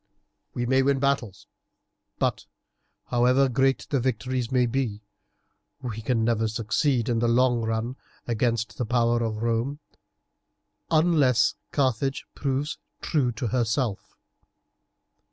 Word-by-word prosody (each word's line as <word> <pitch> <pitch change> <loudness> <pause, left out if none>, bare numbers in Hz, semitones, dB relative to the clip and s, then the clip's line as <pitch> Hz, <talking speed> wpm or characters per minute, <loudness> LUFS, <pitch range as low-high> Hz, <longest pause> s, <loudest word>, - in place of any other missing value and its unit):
"We 120 - -1
may 130 +2 +3
win 140 +1 +2
battles, 135 -7 -1 0.7
but, - - -1 0.6
however 125 +3 +4
great 135 +2 +1
the 140 - +2
victories 125 0 -2
may 125 -1 +3
be, 115 -4 -2 0.8
we 115 -3 -5
can 115 0 0
never 115 -1 +1
succeed 115 +3 0
in 115 -2 +1
the 120 - +2
long 120 0 +3
run 115 +3 -2 0.3
against 115 -1 -1
the 125 - 0
power 120 0 +2
of 110 -1 -2
Rome 120 +5 -1 1.1
unless 155 -7 +3 0.2
Carthage 135 -1 0
proves 140 +1 -2 0.2
true 140 -6 +1
to 115 +1 -3
herself. 120 -2 -1
120 Hz, 115 wpm, -26 LUFS, 115-135 Hz, 1.1 s, however